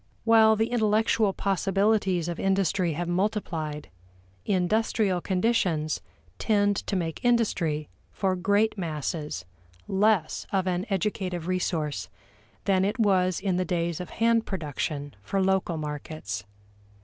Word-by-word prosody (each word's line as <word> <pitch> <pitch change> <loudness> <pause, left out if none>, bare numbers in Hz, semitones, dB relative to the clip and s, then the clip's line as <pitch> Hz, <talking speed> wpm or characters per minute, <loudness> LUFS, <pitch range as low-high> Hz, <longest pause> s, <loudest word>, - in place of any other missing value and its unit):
While 220 -1 +6
the 225 +2 0
intellectual 220 -2 +2
possibilities 195 -2 +1
of 170 -1 -4
industry 190 -3 +1
have 175 +3 -3
multiplied, 175 - -2 0.6
industrial 195 0 +1
conditions 180 -6 0 0.4
tend 205 -2 +2
to 200 - -1
make 165 -3 -3
industry, 175 -11 +1 0.2
for 190 -2 0
great 205 +3 +1
masses, 150 - -3 0.4
less 195 -4 +1
of 190 -2 +1
an 185 +3 -1
educative 190 -3 -2
resource 170 -7 -1 0.6
than 190 -2 +3
it 205 +5 -1
was 185 -4 +3
in 190 -3 0
the 185 - +1
days 170 -2 -1
of 180 - -6
hand 230 0 +2
production 145 - -3
for 195 - -2
local 190 -3 +1
markets. 150 - -5
185 Hz, 120 wpm, -27 LUFS, 165-205 Hz, 0.6 s, While